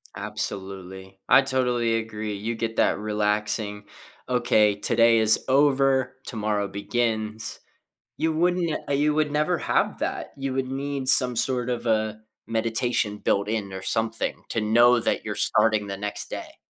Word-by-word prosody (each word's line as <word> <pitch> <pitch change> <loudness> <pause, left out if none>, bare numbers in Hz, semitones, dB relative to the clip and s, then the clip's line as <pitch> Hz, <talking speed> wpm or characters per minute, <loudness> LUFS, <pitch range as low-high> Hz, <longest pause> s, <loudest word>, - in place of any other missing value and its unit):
Absolutely. 95 -3 -6
I 135 +2 +7
totally 125 -3 0
agree. 110 -1 -4
You 110 +4 -3
get 115 0 -4
that - - +3
relaxing 105 0 -1 0.4
"Okay, 120 -4 +3
today 115 +2 +3
is 110 0 +4
over. 135 -1 +3
Tomorrow 105 -3 -2
begins." 110 +1 -2 0.6
You 160 0 0
wouldn't 175 +1 +1
n - - -1
uh, - - 0
you 145 +2 +2
would 155 -1 +1
never 155 +4 +1
have - - 0
that. - - -4
You 135 -1 -3
would 130 -1 -1
need 135 0 -3
some 125 -2 +5
sort 125 0 +1
of 120 -1 -3
a 110 -1 0 0.3
meditation 115 -1 -1
built 100 0 0
in 105 -3 -2
or 95 0 -6
something 115 +3 -2
to 115 - 0
know 120 +3 +5
that - - -1
you're - - -3
starting 110 -2 +2
the 100 - -4
next 105 +1 -4
day. - - -7
115 Hz, 155 wpm, -25 LUFS, 105-130 Hz, 0.6 s, I